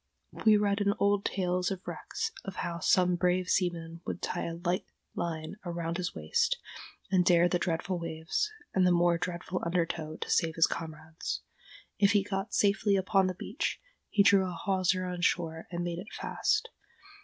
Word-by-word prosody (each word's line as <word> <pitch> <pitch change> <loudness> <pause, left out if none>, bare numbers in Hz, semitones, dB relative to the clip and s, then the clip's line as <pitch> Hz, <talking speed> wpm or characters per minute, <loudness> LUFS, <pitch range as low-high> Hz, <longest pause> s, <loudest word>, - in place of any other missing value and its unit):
We 215 -1 +8
read 205 0 +1
in 200 0 +2
old 200 0 +2
tales 180 -1 0
of 190 -2 -5
wrecks 455 0 -3
of - - -6
how 170 -1 -3
some 180 +2 +3
brave 180 +1 +1
seaman 170 -2 0
would - - -4
tie 175 - -2
a 165 - -4
light 175 +1 -1 0.3
line 160 +1 -4
around 170 -1 -3
his 180 -2 -3
waist, 80 -1 +1 0.5
and 185 -2 +4
dare 175 0 +5
the 175 0 +1
dreadful 175 +1 -1
waves, 165 - -2 0.2
and 185 -1 +4
the - - +4
more 175 -1 +3
dreadful 180 +1 -3
undertow, 165 -2 -1
to - - -5
save 160 -1 +2
his 165 - +6
comrades. 160 0 -5 0.6
If 205 0 +5
he 205 -2 +4
got 195 +1 -3
safely 205 0 +3
upon 190 0 +3
the 185 - -2
beach, 210 +6 -3 0.3
he 205 - +4
drew 195 -2 +5
a - - -5
hawser 185 0 +1
on 180 -1 -4
shore 165 -2 0
and 175 -1 -3
made 175 -1 -3
it 195 - -9
fast. 430 0 0
180 Hz, 180 wpm, -30 LUFS, 170-195 Hz, 0.6 s, We